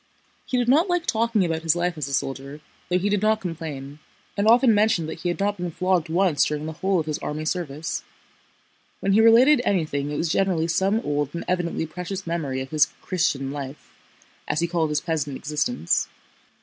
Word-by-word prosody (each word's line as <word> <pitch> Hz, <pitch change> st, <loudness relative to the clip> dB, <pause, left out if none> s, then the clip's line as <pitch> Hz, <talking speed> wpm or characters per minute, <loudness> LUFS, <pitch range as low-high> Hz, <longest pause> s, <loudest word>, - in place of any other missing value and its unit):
He 255 Hz, -, 0 dB
did 245 Hz, -1 st, +1 dB
not 310 Hz, +9 st, +4 dB
like 355 Hz, -1 st, 0 dB
talking 225 Hz, -, +1 dB
about 160 Hz, -1 st, -2 dB
his 165 Hz, 0 st, +2 dB
life 175 Hz, 0 st, -1 dB
as 150 Hz, -3 st, -4 dB
a 140 Hz, -, -5 dB
soldier, 140 Hz, +2 st, -4 dB, 0.3 s
though 180 Hz, -, +3 dB
he 190 Hz, +3 st, 0 dB
did 205 Hz, -1 st, +1 dB
not 215 Hz, 0 st, +2 dB
complain, 155 Hz, -6 st, -6 dB, 0.4 s
and 200 Hz, +1 st, +1 dB
often 235 Hz, +1 st, +6 dB
mentioned 205 Hz, -6 st, +2 dB
that 160 Hz, -, -6 dB
he 175 Hz, -, -2 dB
had 175 Hz, -, -3 dB
not 205 Hz, +1 st, 0 dB
been 175 Hz, 0 st, -3 dB
flogged 180 Hz, -1 st, 0 dB
once 170 Hz, -3 st, +3 dB
during 150 Hz, 0 st, -2 dB
the 160 Hz, -, -4 dB
whole 190 Hz, +3 st, 0 dB
of 160 Hz, -, -2 dB
his 155 Hz, -1 st, -3 dB
army 155 Hz, +1 st, -4 dB
service. 155 Hz, -2 st, -3 dB, 1.0 s
When 195 Hz, 0 st, +1 dB
he 215 Hz, -, +5 dB
related 245 Hz, +5 st, +6 dB
anything 155 Hz, -, 0 dB
it 145 Hz, -, -3 dB
was 165 Hz, -, -1 dB
generally 175 Hz, -4 st, +1 dB
some 190 Hz, +6 st, +1 dB
old 145 Hz, -, -2 dB
and 170 Hz, -, -4 dB
evidently 175 Hz, -2 st, -1 dB
precious 180 Hz, +4 st, -6 dB
memory 150 Hz, -6 st, -2 dB
of 130 Hz, -, -7 dB
his 155 Hz, 0 st, +4 dB, 0.2 s
"Christian" 140 Hz, -7 st, 0 dB
life, 140 Hz, 0 st, -7 dB, 0.6 s
as 150 Hz, -, 0 dB
he 170 Hz, -, +2 dB
called 165 Hz, -2 st, 0 dB
his 150 Hz, 0 st, 0 dB
peasant 150 Hz, -5 st, -2 dB
existence. 145 Hz, -, 0 dB
170 Hz, 200 wpm, -24 LUFS, 150-195 Hz, 1.0 s, often